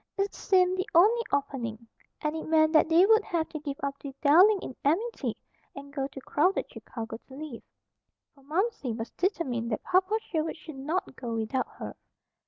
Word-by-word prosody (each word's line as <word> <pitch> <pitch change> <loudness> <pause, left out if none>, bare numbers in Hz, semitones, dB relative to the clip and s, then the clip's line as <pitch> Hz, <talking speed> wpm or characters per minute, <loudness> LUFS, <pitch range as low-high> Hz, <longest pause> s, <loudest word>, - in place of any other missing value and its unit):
It 395 0 0
seemed 370 -1 +2
the 380 +3 -2
only 430 +8 +6
opening, 240 -5 -2 0.3
and 300 +1 -1
it 320 - -5
meant 315 0 +4
that 315 0 +5
they 335 +3 +6
would 440 0 +5
have 330 -4 -1
to 310 - -5
give 285 -2 -5
up 280 0 -2
the 275 -2 -8
"dwelling 365 +9 +7
in 260 - -7
amity" 405 +12 0 0.4
and 280 0 -10
go 270 -2 -1
to 275 - -10
crowded 360 +9 +1
Chicago 225 -2 -7
to 265 - -14
live. 290 -5 -7 0.7
For 280 - -22
Momsey 310 - -1
was 225 +1 -5
determined 260 - -1
that 215 - -2
Papa 375 +4 +2
Sherwood 320 -6 -3
should 310 -2 -10
not 310 +1 -2
go 235 -3 -4
without 225 +4 -1
her. - - -6
310 Hz, 185 wpm, -28 LUFS, 270-370 Hz, 0.7 s, dwelling